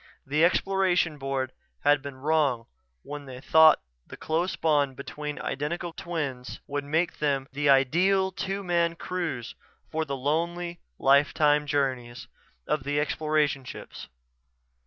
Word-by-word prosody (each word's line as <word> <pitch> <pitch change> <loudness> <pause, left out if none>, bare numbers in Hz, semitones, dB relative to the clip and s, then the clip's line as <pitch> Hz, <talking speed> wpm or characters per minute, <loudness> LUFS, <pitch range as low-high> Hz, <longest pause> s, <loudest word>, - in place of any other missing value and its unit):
The 150 +4 +1
Exploration 180 -3 +2
Board 135 -1 -2 0.3
had 145 -1 +4
been 140 -1 -7
wrong 140 -4 +1 0.4
when 145 0 -7
they 130 -2 -9
thought 160 +3 +6 0.2
the - - -10
close 170 +3 -1
bond 145 -5 +1
between 150 +2 -6
identical 165 +5 -3
twins 145 -9 -4
would 145 0 -3
make 160 +5 -1
them 140 -3 0
the 145 +1 +1
ideal 180 +9 +4
two 195 +2 -3
man 170 -2 +1
crews 165 -10 -4 0.4
for 160 0 0
the 140 -3 -4
lonely, 170 +5 -2 0.2
lifetime 145 +2 +3
journeys 130 -4 -2 0.4
of 150 - 0
the 145 +1 0
Exploration 150 -2 0
Ships. 125 - -9
150 Hz, 130 wpm, -27 LUFS, 140-170 Hz, 0.4 s, thought